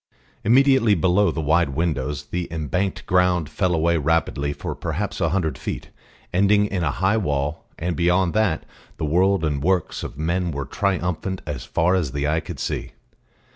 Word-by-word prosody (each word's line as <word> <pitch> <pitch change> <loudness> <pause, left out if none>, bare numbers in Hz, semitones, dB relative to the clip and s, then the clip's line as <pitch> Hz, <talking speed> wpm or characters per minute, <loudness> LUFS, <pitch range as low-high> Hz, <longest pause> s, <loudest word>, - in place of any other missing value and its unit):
Immediately 130 -2 +5
below 95 +3 +3
the 80 0 -2
wide 75 -2 +2
windows 75 -4 -1
the 90 -1 -3
embanked 85 +4 -2
ground 90 -3 +2
fell 90 -3 0
away 85 +1 +2
rapidly 75 -2 0
for - - -5
perhaps 95 +5 -3
a 80 - +2
hundred 85 -3 -1
feet, - - -5 0.4
ending 100 +3 +4
in 95 -3 -2
a 80 - +1
high 95 +8 +1
wall, 75 -6 -1
and 85 +1 -2
beyond 90 +2 +2
that 105 -7 +1 0.3
the - - -2
world 90 +3 +2
and 75 -2 -1
works 90 +2 0
of - - -7
men 85 +3 0
were 70 -3 -3
triumphant 90 +2 -2
as 70 -5 -5
far 85 +3 +1
as 80 -8 0
eye 75 +2 +1
could - - -8
see. - - -3
85 Hz, 170 wpm, -23 LUFS, 75-95 Hz, 0.4 s, Immediately